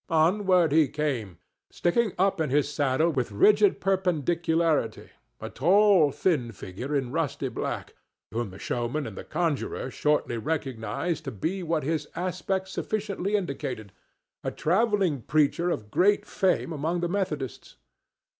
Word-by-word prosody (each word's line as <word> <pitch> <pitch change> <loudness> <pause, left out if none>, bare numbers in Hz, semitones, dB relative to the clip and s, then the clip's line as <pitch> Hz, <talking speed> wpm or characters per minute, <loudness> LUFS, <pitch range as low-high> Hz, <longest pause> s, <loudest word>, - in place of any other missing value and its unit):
Onward 175 +1 +3
he 155 -1 +5
came, 125 - -3 0.3
sticking 210 +5 +1
up 190 -2 +2
in 155 - 0
his 145 +2 +2
saddle 145 +2 +1
with 130 -7 -2
rigid 205 - +4
perpendicularity, 170 - 0 0.3
a - - -6
tall, 185 -1 +4
thin 135 -11 0
figure 115 +8 -6
in 130 -3 -1
rusty 160 -2 -1
black, - - -4 0.4
whom 115 -1 -2
the 95 - -11
showman 120 +7 -2
and 110 - -7
the - - -7
conjurer 155 -5 -2
shortly 150 -6 0
recognized 135 +3 -2
to 135 - -3
be 165 - -3
what 165 -2 -1
his 155 +2 -1
aspect 185 +2 -2
sufficiently 200 0 -2
indicated—a 140 - -6
travelling 190 - +1
preacher 155 +6 +2
of 105 -10 -3
great 195 +6 +3
fame 185 -4 0
among 160 +4 -1
the 175 - 0
Methodists. 165 -9 -3
160 Hz, 135 wpm, -27 LUFS, 135-185 Hz, 0.4 s, he